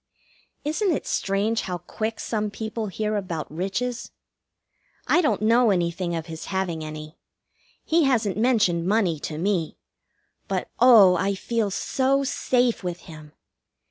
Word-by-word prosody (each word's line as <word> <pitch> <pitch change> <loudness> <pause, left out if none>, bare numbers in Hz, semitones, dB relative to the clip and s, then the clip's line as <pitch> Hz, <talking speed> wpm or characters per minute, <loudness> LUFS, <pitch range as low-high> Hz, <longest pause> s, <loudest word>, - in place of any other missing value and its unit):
Isn't 315 +7 0
it 305 - -2
strange 205 +3 0
how 180 -1 -4
quick 220 +5 -5
some 215 -2 -2
people 220 +1 -4
hear 215 +2 -2
about 175 -7 -4
riches? 215 +8 -3 1.0
I 350 - +3
don't 295 -9 0
know 230 +2 +4
anything 175 -2 0
of 165 -1 -4
his 160 -1 -8
having 185 -4 -2
any. 155 +1 -8 0.7
He 325 -1 +3
hasn't 225 -7 +1
mentioned 210 -7 +2
money 195 -6 +1
to 150 +1 -5
me; 175 -2 -1 0.7
but 190 -2 -3
oh, 225 -7 +7
I 195 +1 0
feel 225 +1 -1
so 270 +7 0
safe 250 -4 0
with 175 -1 -4
him! 155 -3 -12
200 Hz, 140 wpm, -24 LUFS, 175-230 Hz, 1.0 s, oh